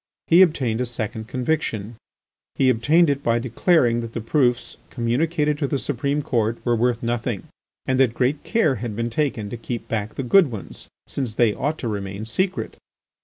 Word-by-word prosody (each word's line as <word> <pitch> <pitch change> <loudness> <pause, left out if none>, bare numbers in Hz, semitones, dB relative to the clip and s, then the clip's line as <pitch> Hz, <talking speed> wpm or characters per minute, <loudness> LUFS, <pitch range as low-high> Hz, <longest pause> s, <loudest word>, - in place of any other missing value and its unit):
He 170 +3 +6
obtained 130 -10 +2
a 125 - -1
second 110 -2 -4
conviction; 120 -5 -2 0.6
he 130 -1 +4
obtained 150 +9 +3
it 140 -1 0
by 115 -2 +2
declaring 120 - +2
that 115 -1 -6
the - - -3
proofs 120 +1 0
communicated 150 +5 0
to 140 - 0
the 140 - -1
Supreme 140 +2 -1
Court 115 -3 0
were 120 -1 +3
worth 120 0 0
nothing, 120 -3 -2 0.4
and 130 0 +1
that 125 -3 +3
great 135 +3 0
care 155 - +1
had 115 -4 -4
been 115 +1 -2
taken 120 -5 -1
to 120 - -4
keep 115 0 -5
back 110 -1 -3
the 135 - -3
good 165 +5 +5
ones, 110 -5 -9 0.2
since 125 -6 -3
they 115 -3 +3
ought 150 +7 -2
to 120 - -4
remain 100 -1 -4
secret. 185 - -2
120 Hz, 180 wpm, -23 LUFS, 115-145 Hz, 0.6 s, He